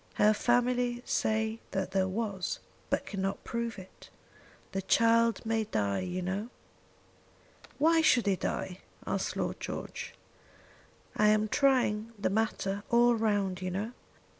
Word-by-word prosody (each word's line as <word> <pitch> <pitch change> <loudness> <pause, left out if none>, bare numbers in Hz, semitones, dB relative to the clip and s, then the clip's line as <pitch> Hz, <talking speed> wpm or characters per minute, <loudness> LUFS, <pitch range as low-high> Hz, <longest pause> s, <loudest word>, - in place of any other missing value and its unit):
Her 210 +1 +5
family 245 +1 +1
say 220 +1 0
that 190 -1 -2
there 190 -1 +2
was, 195 -2 -2 0.3
but - - 0
cannot 195 -1 -3
prove 235 -1 -3
it. 190 -1 -13 0.6
The 195 - -2
child 230 +3 +3
may 225 -1 0
die, 100 - 0
you 185 0 -3
know." 195 +5 -3 1.3
"Why 325 +3 +4
should 255 -8 +4
he 200 -1 +3
die?" 185 0 -3 0.3
asked - - -2
Lord - - -2
George. - - -6 1.0
"I 210 - +4
am 215 0 +4
trying 230 -4 +2
the 200 - 0
matter 200 -2 -1
all 240 0 +5
round, 205 -5 0
you 185 - -2
know. 200 +5 -3
215 Hz, 135 wpm, -30 LUFS, 195-235 Hz, 1.3 s, Her